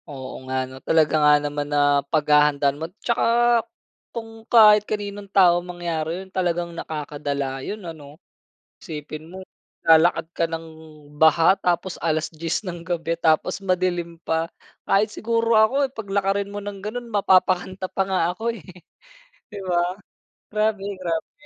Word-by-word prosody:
Oo 130 -3 -7 0.2
nga 130 - -1
'no, 130 - -12
talaga 155 -2 +2
nga 150 0 +6
naman 145 0 -3
na 145 -1 +3
paghahandaan 150 -2 +3
mo. - - -1 0.2
Tsaka 235 0 +3 0.5
kung 225 -1 -8
kahit 215 -2 +7
kaninong 205 -1 -4
tao 180 -3 +5
mangyari 175 0 -4
yun, 190 - -22
talagang 175 -2 -1
nakakadala 145 -4 -4
yun 205 +5 -6
ano? 150 -3 -10 0.6
Isipin 155 -1 -8
mo 190 +1 -9 0.4
naglalakad 165 0 +5
ka 170 - +1
ng 165 0 -5 0.6
baha, 160 +3 +6
tapos 175 +1 -1
alas-10 160 +3 -2
ng 175 -2 -5
gabi, 165 -1 -2
tapos 165 +4 +2
madilim 180 -3 -1
pa. 160 +1 0 0.4
Kahit 210 +2 +2
siguro 230 +1 0
ako 220 +5 +3
eh 260 - -25
paglakarin 200 -2 -1
mo 205 - -7
ng 205 -1 -6
ganon, 235 +4 -5
mapapakanta 185 -1 +2
pa 190 - -2
nga 190 -1 +1
ako 225 +5 -3
eh 185 - -15 0.9
di 205 - -7
ba? 175 0 0 0.6
Grabe, 215 -1 0 0.2
grabe. 165 -3 -3
175 Hz, 140 wpm, -23 LUFS, 160-200 Hz, 0.9 s, kahit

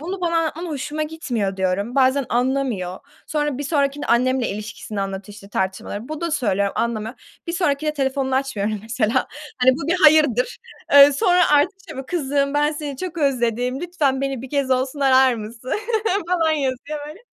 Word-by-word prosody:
"Bunu 365 +4 -5
bana 335 -1 0
anlatman 330 +2 -2
hoşuma 300 0 -3
gitmiyor." 240 -11 -3
diyorum. 190 +6 -1
Bazen 265 -1 +3
anlamıyor. 245 -7 -1 0.3
Sonra 295 -3 -1
bir - - -3
sonrakinde 285 -1 0
annemle 255 +1 +2
ilişkisini 210 0 -6
anlatıyor, 195 +1 -5
işte, 200 -2 -13
tartışmaları. 195 +4 -3
Bu 310 0 -5
da 340 -1 -2
söylüyorum, 200 -7 0
anlamıyor. 230 0 -2 0.3
Bir 335 - -3
sonrakinde 305 -3 0
telefonunu 265 -1 -1
açmıyorum, 215 -6 -1
mesela. 225 0 0 0.3
Hani, 255 +1 +5
bu 330 - -5
bir 360 - +2
hayırdır. 290 -6 +4 0.3
Eee, 285 0 +9
sonra 355 +5 +3
artık 320 +7 +3
şey 315 - -8
mi, 265 -1 -6
"Kızım, 280 -4 0
ben 295 +1 +2
seni 295 -3 -5
çok 360 -2 -5
özledim, 250 -2 0
lütfen 300 -7 0
beni 270 -3 -2
bir 260 - -9
kez 280 -2 0
olsun 260 +3 0
arar 260 -2 +5
mısın?" 225 +3 -7 0.6
falan 330 -3 +2
yazıyor 285 +1 -2
böyle. 310 +6 -10
270 Hz, 170 wpm, -21 LUFS, 235-300 Hz, 0.6 s, Eee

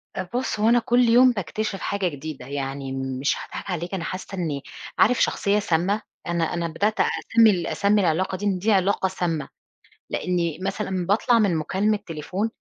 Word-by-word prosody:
طب 185 - -4
بُص 250 -4 -1
هو 220 +2 +4
أنا 240 0 +5
كُلّ 240 +1 +3
يوم 250 +2 +7
باكتشف 210 0 -3
حاجة 200 -2 -1
جديدة، 155 -1 -6
يعني 135 -1 -4
مش 135 +1 -1
هاضحك - - -7
عليك 175 +2 -4
أنا 180 -3 -2
حَاسَّة 185 +2 -5
إني 150 -6 -2 0.4
عارف 245 +2 +4
شخصية 205 +1 +2
سامّة؟ 195 +3 0 0.3
أنا 170 -1 0
أنا 170 -1 -1
بدأت 205 +7 -1
أسمي 225 -1 +4
ال 175 -3 -1
أسمي 205 +1 +2
العلاقة 185 +2 0
دي 205 - -5
إن 190 -3 +1
دي 215 +4 +1
علاقة 190 0 +2
سامّة، 165 -5 -2 0.6
لإني 170 -2 -1
مثلًا 190 -3 -2
باطلع 230 +3 +3
من 195 -6 +2
مُكالمة 200 +7 0
تليفون، 180 +7 -3
185 Hz, 175 wpm, -24 LUFS, 165-210 Hz, 0.6 s, يوم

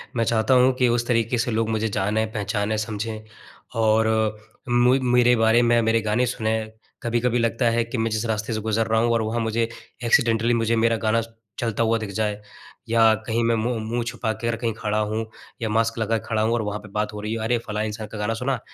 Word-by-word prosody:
मैं 115 - +2
चाहता 115 +2 +2
हूँ 130 +1 +5
कि 125 - +3
उस 120 0 0
तरीक़े 115 0 +1
से 120 +1 0
लोग 110 0 0
मुझे 110 0 0
जाने, 105 +2 0
पहचानें, 105 0 -2
समझें 110 0 -4 0.6
और 110 0 +3 0.6
मुइ 120 +2 +4
मेरे 125 0 +4
बारे 115 +1 +4
में 120 0 +3
मेरे 115 0 +2
गाने 110 +4 +1
सुनें। 110 -2 -2 0.3
कभी-कभी 120 +1 +1
लगता 115 +1 0
है 115 0 +1
कि 115 +2 -5
मैं 115 0 0
जिस 110 +2 -1
रास्ते 110 +1 -2
से 110 - -1
गुज़र 110 +1 0
रहा 110 0 +2
हूँ 120 0 +2
और 115 - +2
वहाँ 110 +2 -1
मुझे 115 +1 0 0.4
एक्सीडेंटली 115 0 +3
मुझे 115 0 +1
मेरा 115 0 +2
गाना 110 +1 +1 0.4
चलता 115 -1 0
हुआ 115 0 +2
दिख 110 -2 -5
जाए। 105 -1 -1 0.5
या 115 -1 +5
कहीं 115 +1 0
मैं 115 0 +2
मु 115 +3 -1
मुँह 115 +2 -2
छुपाकर 115 -1 -2
कहीं 115 -1 -2
खड़ा 105 -1 -2
हूँ 110 +1 -1 0.4
या 110 - -1
मास्क 115 +1 +1
लगा 115 +1 +1
के 110 - -9
खड़ा 110 -2 0
हूँ 110 +1 +1
और 120 - +1
वहाँ 105 0 -3
पे 105 0 -13
बात 105 +1 -2
हो 105 - -6
रही 105 +1 -3
है, 115 - -3
अरे 120 +2 +1
फलाँ 105 0 -2
इंसान 110 0 -5
का 110 - -7
गाना 105 +2 -1
सुना, 125 +2 -2
115 Hz, 225 wpm, -23 LUFS, 110-115 Hz, 0.6 s, हूँ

